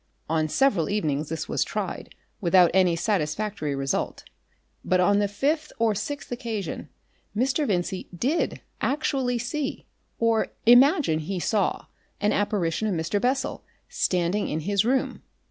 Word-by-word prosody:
On 155 0 0
several 205 - +2
evenings 155 -8 -1
this 160 0 -4
was - - +1
tried - - -5 0.2
without 180 -2 +5
any 180 -2 +4
satisfactory 170 -3 -1
result, 135 0 -2 0.6
but 185 - +2
on 200 +3 +4
the 205 - +2
fifth 295 +10 -1
or 225 -1 +2
sixth 250 +9 -5
occasion 220 - -4 0.5
Mr. 270 +5 +1
Vincey 185 -1 -2
did 260 - -1 0.2
actually 265 -3 0
see 270 +5 -3 0.3
or 230 -1 +2 0.2
imagine 250 - +6
he 180 +4 -3
saw 200 +2 0 0.3
an 205 +1 +2
apparition 205 -1 0
of 200 - 0
Mr. 165 +5 -1
Bessel 260 +2 -1 0.3
standing 180 +3 0
in 155 - -2
his 200 +4 +1
room. 255 +3 0
205 Hz, 135 wpm, -25 LUFS, 170-245 Hz, 0.6 s, imagine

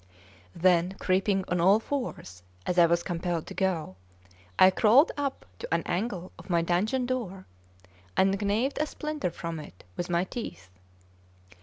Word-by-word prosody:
Then, 180 +1 +3
creeping 190 +1 +1
on 180 -1 0
all 195 +5 +5
fours, 225 - -5 0.2
as 180 - +1
I 170 - +7
was 170 +1 +1
compelled 175 -2 -2
to - - -8
go, 175 - -1 0.6
I 185 - +8
crawled 235 - +5
up 280 -2 -3
to - - -7
an 165 0 +1
angle 185 -1 -3
of - - -13
my 170 -1 +2
dungeon 210 +10 +1
door, 220 -7 -4 0.7
and 195 +1 +3
gnawed 220 +8 0
a 305 - +1
splinter 300 -7 -3
from 165 -1 -5
it 145 -12 -12
with 175 - -4
my 170 0 +2
teeth. 180 - -7
185 Hz, 155 wpm, -28 LUFS, 170-220 Hz, 0.7 s, I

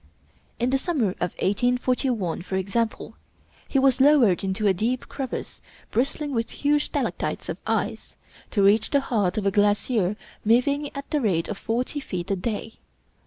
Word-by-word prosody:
In 245 +2 0
the 270 - +2
summer 275 - 0
of 180 - -1
1841, 245 -3 0
for 190 - -4
example, 210 +4 -1 0.5
he - - 0
was 265 -1 +4
lowered 265 - +5
into 190 +2 -1
a 200 - +5
deep 235 +7 -1
crevasse 265 -3 -5 0.3
bristling 280 +4 -1
with 230 -2 -1
huge 295 0 +1
stalactites - - -2
of - - -4
ice, - - -2 0.3
to 200 - +1
reach 210 +3 +4
the 280 - +3
heart 215 -9 0
of 210 - -1
a 195 - +3
glacier 205 0 +2 0.3
moving 280 +6 +2
at 280 0 -6
the 300 - +1
rate 180 -8 +1
of 200 - -4
forty 250 +6 -2
feet 180 -9 -4
a - - +2
day. 220 +3 -4
230 Hz, 165 wpm, -25 LUFS, 200-270 Hz, 0.5 s, lowered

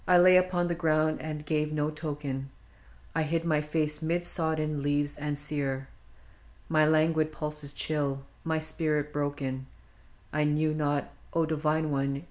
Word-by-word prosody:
1 180 -1 +6
lay 185 0 +8
upon 185 -1 +3
the 175 - 0
ground 155 -2 +1
and 150 -1 -5
gave 150 0 0
no 150 0 0
token, 145 -3 -4 0.6
I 160 - +1
hid 165 +2 0
my 155 -3 +2
face 150 0 -1
mid 170 +2 0
sodden 155 -3 0
leaves 145 0 +1
and 150 0 -3
sere, 140 -2 -2 0.8
My 155 -1 +4
languid 155 0 +3
pulses 150 -2 -4
chill, 140 -2 -1 0.2
my 160 -1 0
spirit 155 -2 -1
broken, 140 -2 -2 0.3
— - - -30
I 150 0 +2
knew 155 +1 +2
not, 145 -2 0 0.2
O 165 -1 +3
divine 155 0 0
one 140 0 0
150 Hz, 155 wpm, -29 LUFS, 145-160 Hz, 0.8 s, lay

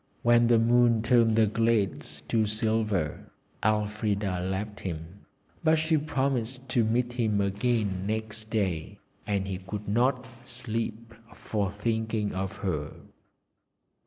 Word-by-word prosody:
When 120 0 +5
the 120 -1 +5
moon 115 0 +4
turned 115 -2 +4
the 110 -1 +5
glades 110 -3 0
to 110 -2 +2
silver, 110 -6 -1 0.3
Elfrida 105 -2 0
left 95 +3 -3
him, 85 +2 -7 0.4
but 160 -1 +5
she 160 +1 +2
promised 130 -3 -1
to 120 -2 +3
meet 120 +2 0
him 110 -4 +1
again 100 -1 0
next 110 0 -4
day, 95 -8 -1 0.3
and 100 -2 0
he 95 -2 -3
could 100 +2 -6
not 125 +4 +2 0.2
sleep 115 -2 -4 0.2
for 100 -3 -2
thinking 110 0 -1
of 95 0 -3
her. 75 -5 -2
110 Hz, 125 wpm, -28 LUFS, 100-120 Hz, 0.4 s, When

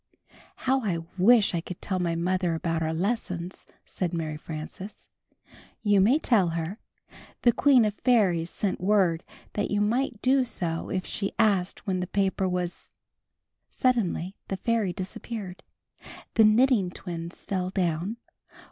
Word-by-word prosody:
"How 265 +1 +1
I 185 -6 0 0.2
wish 220 +2 +5
I 170 - 0
could 175 +1 -8
tell 185 -2 -2
my 170 -2 0
mother 180 0 0
about 165 -1 -1
our 160 0 0
lessons," 180 -1 -3 0.2
said 175 -2 -3
Mary 155 -2 -3
Frances. 160 +6 -8 0.8
"You 205 -2 +4
may 235 +9 +5
tell 225 - +3
her. 165 +7 -4 0.6
The 240 - +6
Queen 260 -1 +5
of 210 - 0
Fairies 195 -9 +2
sent 195 -1 -2
word 185 -4 +2 0.3
that 205 - -1
you 205 - +1
might 230 +2 0
do 260 +1 +4
so 170 -9 -3
if 185 +2 -3
you 200 - +1
asked 200 -4 +1
when 190 -3 0
the 180 - -2
paper 195 -1 0
was 180 -1 -4 0.4
" - - -58 0.3
Suddenly 205 -7 0
the 195 - -3
fairy 225 -3 0
disappeared. 195 +1 -6 0.7
The 220 - +6
Knitting 215 -3 +4
Twins 170 -1 -7
fell 185 -2 -2
down. 180 +3 -1
190 Hz, 145 wpm, -27 LUFS, 175-220 Hz, 0.8 s, The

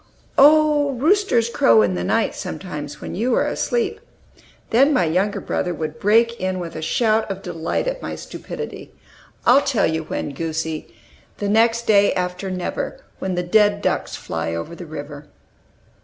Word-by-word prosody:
"Oh, 295 0 +5
roosters 290 - +2
crow 115 - +4
in 100 -3 +1
the 90 -1 -2
night, - - +1
sometimes, 150 -5 -6
when - - -6
you 235 +6 0
are - - +2
asleep." 450 -3 -1 0.7
Then 270 +6 +5
my 185 - +3
younger 185 +6 0
brother 180 -1 -2
would 155 0 -5
break 230 +3 +3
in 185 0 -1
with 175 -2 -6
a 155 - -5
shout 220 +6 +1
of 195 0 -5
delight 165 - -2
at - - -3
my - - -5
stupidity: - - -8 0.5
"I'll 260 +4 +6
tell 265 -7 +1
you 160 0 0
when, 145 - -4
goosie! 160 -2 -4 0.5
'The 205 - -2
next 230 +2 +3
day 200 -2 +4
after 180 +1 -3
never; 180 -1 -4 0.2
When 190 -1 -2
the 180 - -1
dead 205 +2 +3
ducks - - -1
fly 80 0 -4
over 85 - -5
the 170 0 -9
river.'" 145 -1 -8
190 Hz, 165 wpm, -21 LUFS, 160-235 Hz, 0.7 s, I'll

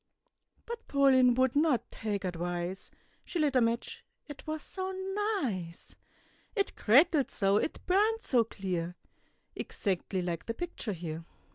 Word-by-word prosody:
But 470 0 -7
Pauline 260 -3 +5
would 260 0 +2
not 295 -4 +2
take 205 -3 -3
advice, 175 +1 -3 0.3
She - - -4
lit 295 -4 +2
a 255 - +6
match, 230 +1 -1 0.2
it 290 +1 -10
was 310 -1 -3
so 375 0 -3 0.5
nice! 180 -8 -4 0.6
It 400 -3 0
crackled 280 +5 +5
so, 195 0 +2
it 315 - -2
burned 430 +5 +2
so 245 -3 +3
clear, 180 -5 -3 0.6
Exactly 190 -1 -2
like 170 -2 -3
the 230 - -2
picture 340 -10 -4
here. 165 -2 -5
230 Hz, 135 wpm, -31 LUFS, 185-295 Hz, 0.6 s, a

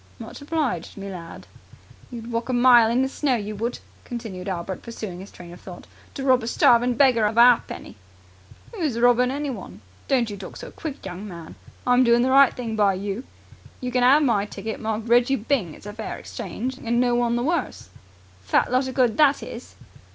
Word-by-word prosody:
"Much - - -10
obliged, 285 - -2
me 195 0 -6
lad." 170 -3 -9 0.6
"You'd 235 -1 -8
walk 230 +2 -3
a - - 0
mile 240 -2 +6
in 245 +3 +2
the - - +1
snow, 270 -1 0
you 210 -1 -4
would," 235 +3 -2 0.3
continued 215 -6 -6
Albert 185 0 -4
pursuing 215 -6 -7
his 195 +2 -10
train 175 -1 -12
of 175 - -14
thought, 180 -2 -11 0.3
"to 270 - -5
rob 260 -2 +4
a 225 - -6
starving 240 +1 +3
beggar 240 -5 +4
of 220 +2 -4
a - - +8
ha'penny." 245 - +2 0.8
"Who's 315 - -2
robbing 245 +1 +4
anyone? 275 -6 -5 0.3
Don't 245 -5 +1
you 205 - -6
talk 190 - -9
so - - -9
quick, 300 -8 -7
young 190 +2 -7
man. 170 -4 -9 0.3
I'm 250 +1 +4
doing 235 0 +4
the 260 - +1
right 275 0 +6
thing 230 -3 -5
by 205 -3 +3
you. 200 +6 -4 0.5
You 250 -1 -4
can 250 0 +1
'ave 285 +4 +5
my 210 -5 +1
ticket, 210 +2 -6
marked 220 0 -3
'Reggie 240 +3 +4
Byng'. 220 - -1
It's - - -16
a 205 - -7
fair 220 0 -6
exchange, 240 +5 -6
and 235 +1 0
no 245 -1 +2
one 240 -1 +1
the 240 - -1
worse!" 310 - -2 0.5
"Fat 95 - +1
lot 255 +1 +1
of 260 - -6
good 245 -5 +2
that 290 -2 +4
is!" - - -9
235 Hz, 205 wpm, -23 LUFS, 205-255 Hz, 0.8 s, a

